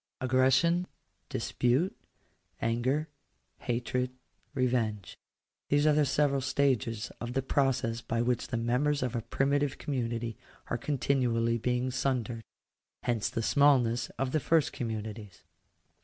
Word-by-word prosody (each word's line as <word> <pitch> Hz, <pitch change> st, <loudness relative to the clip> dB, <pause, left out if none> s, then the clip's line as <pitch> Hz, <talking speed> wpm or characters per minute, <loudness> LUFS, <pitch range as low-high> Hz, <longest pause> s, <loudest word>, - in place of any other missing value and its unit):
Aggression, 130 Hz, +8 st, +3 dB, 0.4 s
dispute, 130 Hz, +10 st, 0 dB, 0.6 s
anger, 130 Hz, +7 st, 0 dB, 0.5 s
hatred, 125 Hz, +1 st, -1 dB, 0.5 s
revenge 115 Hz, -7 st, 0 dB, 0.3 s
— -, -, -61 dB
these 145 Hz, +1 st, +3 dB
are 155 Hz, -, +5 dB
the 150 Hz, -1 st, +3 dB
several 140 Hz, 0 st, +2 dB
stages 130 Hz, -5 st, 0 dB
of 120 Hz, +1 st, -4 dB
the 135 Hz, 0 st, 0 dB
process 130 Hz, -4 st, +1 dB
by 115 Hz, -1 st, -2 dB
which 120 Hz, 0 st, 0 dB
the 120 Hz, -, -2 dB
members 125 Hz, +5 st, +1 dB
of 125 Hz, -1 st, -2 dB
a 115 Hz, -, -1 dB
primitive 140 Hz, +4 st, 0 dB
community 115 Hz, -4 st, -2 dB, 0.4 s
are 120 Hz, -, +1 dB
continually 120 Hz, -4 st, +1 dB
being 125 Hz, +2 st, 0 dB
sundered. 120 Hz, -3 st, -1 dB, 0.6 s
Hence 115 Hz, -3 st, 0 dB
the 115 Hz, -, -2 dB
smallness 125 Hz, -4 st, +3 dB
of 130 Hz, 0 st, -1 dB
the 155 Hz, -, +2 dB
first 160 Hz, +1 st, +2 dB
communities. 110 Hz, -4 st, -5 dB
125 Hz, 125 wpm, -30 LUFS, 115-140 Hz, 0.6 s, are